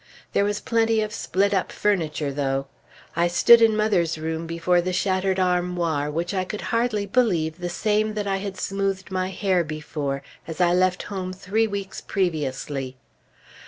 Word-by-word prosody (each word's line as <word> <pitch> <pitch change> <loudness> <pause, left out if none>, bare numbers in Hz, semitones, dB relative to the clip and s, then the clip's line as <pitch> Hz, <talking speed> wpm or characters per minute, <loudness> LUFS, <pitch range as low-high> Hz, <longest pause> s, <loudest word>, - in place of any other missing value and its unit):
There - - +3
was 205 0 -1
plenty 225 -1 +2
of 215 0 -3
split 200 +1 0
up 190 - 0
furniture, 155 -8 0
though. 135 -1 -1 0.5
I 170 +1 +3
stood 230 +7 +6
in 220 -1 +5
mother's 185 -7 +1
room 160 +1 -3
before 170 +2 +2
the 185 +1 -2
shattered 190 0 +1
armoir, 175 -5 0
which 170 +5 -2
I 185 -1 0
could 205 +3 -5
hardly 230 -3 +1
believe 180 -8 +1
the 175 0 -3
same 215 +4 0
that 210 -1 -2
I 195 -1 0
had 195 -1 -5
smoothed 195 -1 -2
my 185 0 -1
hair 190 -2 +1
before, 150 -3 -4 0.2
as 165 +1 -6
I 175 -1 +4
left 185 0 +2
home 185 -2 -5
three 205 +4 0
weeks 200 -2 -5
previously. 140 -7 -2
185 Hz, 165 wpm, -24 LUFS, 165-200 Hz, 0.5 s, stood